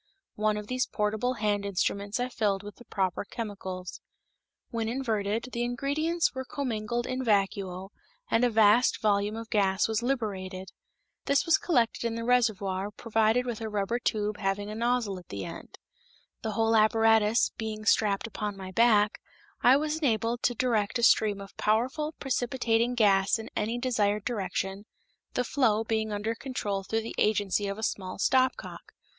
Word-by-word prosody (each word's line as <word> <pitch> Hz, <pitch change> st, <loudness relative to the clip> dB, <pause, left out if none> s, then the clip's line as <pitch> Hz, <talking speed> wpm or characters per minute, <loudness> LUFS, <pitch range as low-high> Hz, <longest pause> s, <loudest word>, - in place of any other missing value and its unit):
One 215 Hz, 0 st, 0 dB
of 210 Hz, -, -5 dB
these 255 Hz, +3 st, -1 dB
portable 215 Hz, +4 st, -1 dB
hand 205 Hz, -1 st, 0 dB
instruments 200 Hz, +2 st, -1 dB
I 245 Hz, -, 0 dB
filled 205 Hz, -5 st, -1 dB
with 205 Hz, 0 st, -10 dB
the 240 Hz, -, -15 dB
proper 190 Hz, -3 st, -1 dB
chemicals. 195 Hz, -5 st, -6 dB, 0.7 s
When 225 Hz, -1 st, -2 dB
inverted, 225 Hz, -2 st, -1 dB
the 235 Hz, -, -3 dB
ingredients 285 Hz, +8 st, 0 dB
were 260 Hz, 0 st, -4 dB
commingled 240 Hz, -4 st, -3 dB
in 255 Hz, 0 st, -3 dB
vacuo 195 Hz, -3 st, 0 dB, 0.4 s
and 225 Hz, -, +3 dB
a 245 Hz, -, +4 dB
vast 220 Hz, +2 st, +4 dB
volume 205 Hz, 0 st, +1 dB
of 225 Hz, 0 st, -8 dB
gas 195 Hz, -2 st, +2 dB
was 220 Hz, 0 st, -1 dB
liberated. 195 Hz, -7 st, -3 dB, 0.6 s
This 280 Hz, +4 st, +2 dB
was 330 Hz, +3 st, +4 dB
collected 255 Hz, -, +1 dB
in 230 Hz, -1 st, -1 dB
the 230 Hz, -, -4 dB
reservoir 205 Hz, -5 st, +1 dB
provided 225 Hz, +3 st, +1 dB
with 235 Hz, -2 st, -4 dB
a 220 Hz, -, -3 dB
rubber 210 Hz, +3 st, -1 dB
tube 210 Hz, -3 st, -1 dB
having 205 Hz, +1 st, -2 dB
a -, -, -5 dB
nozzle 235 Hz, -4 st, 0 dB
at 175 Hz, -, -17 dB
the 100 Hz, -, -5 dB
end. 165 Hz, -, -9 dB, 0.6 s
The 220 Hz, -1 st, -3 dB
whole 225 Hz, +1 st, +2 dB
apparatus 225 Hz, 0 st, +4 dB
being 215 Hz, -1 st, -4 dB
strapped 210 Hz, -2 st, +2 dB
upon 210 Hz, -3 st, -4 dB
my 190 Hz, -1 st, -7 dB
back, 215 Hz, -1 st, +3 dB, 0.4 s
I 255 Hz, +2 st, +6 dB
was 305 Hz, +1 st, -1 dB
enabled 235 Hz, -4 st, 0 dB
to 245 Hz, -, +1 dB
direct 230 Hz, -3 st, 0 dB
a 235 Hz, -, -3 dB
stream 210 Hz, -3 st, +4 dB
of 195 Hz, 0 st, -11 dB
powerful 260 Hz, +9 st, 0 dB
precipitating 245 Hz, -2 st, 0 dB
gas 200 Hz, -3 st, +4 dB
in 220 Hz, -, -8 dB
any 225 Hz, +3 st, -1 dB
desired 215 Hz, -5 st, 0 dB
direction, 195 Hz, -2 st, -3 dB, 0.5 s
the 250 Hz, -, +1 dB
flow 230 Hz, -4 st, +2 dB
being 220 Hz, -1 st, -1 dB
under 210 Hz, +2 st, -2 dB
control 225 Hz, -5 st, -3 dB
through 225 Hz, +3 st, -2 dB
the 225 Hz, -, -6 dB
agency 205 Hz, -1 st, +1 dB
of 200 Hz, +1 st, -4 dB
a 220 Hz, -, -7 dB
small 190 Hz, -3 st, -3 dB
stopcock. 255 Hz, +5 st, 0 dB
220 Hz, 165 wpm, -28 LUFS, 205-240 Hz, 0.7 s, I